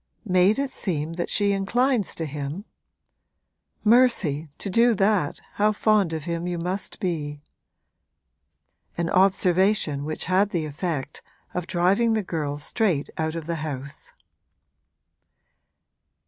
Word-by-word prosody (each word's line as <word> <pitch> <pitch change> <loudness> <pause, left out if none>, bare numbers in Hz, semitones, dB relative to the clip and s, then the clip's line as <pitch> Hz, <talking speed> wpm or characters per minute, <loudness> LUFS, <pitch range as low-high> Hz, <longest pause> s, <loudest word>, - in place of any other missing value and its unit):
'Made 185 +2 +3
it 275 -1 -1
seem 160 -4 -2
that 175 +1 -3
she 205 -1 +2
inclines 230 +3 +1
to 165 - -3
him? 150 +6 -5 1.2
Mercy, 210 - +3
to - - -4
do 230 +4 +4
that 195 -6 +1 0.2
how 210 +1 +5
fond 210 -4 +2
of 160 -2 -4
him 170 +1 -3
you 175 -1 -2
must 180 +4 -4
be!' 155 -7 -3 1.6
An 170 0 -1
observation 185 -4 +3
which 155 +1 -3
had 190 +3 +2
the 170 -5 -2
effect 150 -1 -4 0.3
of 180 -1 -3
driving 195 +7 +2
the 215 -1 0
girl 150 -5 -3
straight 160 -1 -1
out 160 0 -1
of 165 -2 -5
the 170 0 -3
house. 140 -3 -6
180 Hz, 125 wpm, -24 LUFS, 155-205 Hz, 1.6 s, how